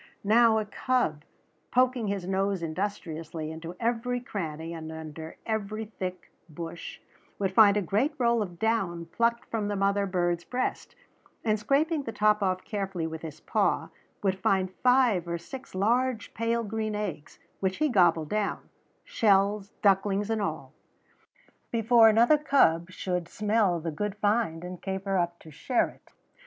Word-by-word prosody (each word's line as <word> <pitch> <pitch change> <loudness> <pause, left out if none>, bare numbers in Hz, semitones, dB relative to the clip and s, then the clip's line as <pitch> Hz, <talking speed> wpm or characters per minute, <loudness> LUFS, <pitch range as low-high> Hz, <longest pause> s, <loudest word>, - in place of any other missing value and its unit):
Now 220 +2 +5
a 215 - 0
cub, 215 - 0 0.5
poking 255 -3 +2
his 195 -2 -2
nose 195 -1 0
industriously 160 -3 -4
into 165 +2 -7
every 240 +1 0
cranny 165 -8 -5
and 160 -1 -7
under 160 0 -8
every 220 0 -2
thick 185 -4 -6 0.2
bush, 165 +2 -7 0.4
would 195 -2 0
find 205 -1 +7
a 205 - +1
great 235 - 0
roll 235 -3 +2
of 175 -4 -5
down 190 -6 0
plucked 235 +7 0
from 215 -3 -1
the 205 - -1
mother 200 0 +1
bird's 175 -2 0
breast, 255 0 -3 0.5
and 215 -1 +2
scraping 290 +8 +1
the 235 - -5
top 210 0 +2
off 185 -1 0
carefully 195 -5 -3
with 160 0 -5
his 155 -2 -8
paw, - - 0 0.3
would 190 -1 +1
find 190 -1 +1
five 250 -9 +4
or 170 0 -2
six 260 +7 -10
large 235 +3 +1
pale 230 +1 0
green 215 0 -3
eggs, 210 -8 -5 0.2
which 190 -1 -1
he 305 - +2
gobbled 170 - +3
down, 210 -1 -2 0.3
shells, 200 -1 +2
ducklings 200 +1 +2
and 220 -1 0
all, - - -4 1.0
before 230 0 +5
another 235 +7 +5
cub 170 - +3
should 180 -2 -3
smell 210 -4 +1
the 165 0 -3
good 205 +6 -3
find 205 -6 0
and 180 0 -7
caper 195 0 -2
up 175 0 -1
to 160 - -14
share 240 - 0
it. - - -20
200 Hz, 155 wpm, -28 LUFS, 175-225 Hz, 1.0 s, find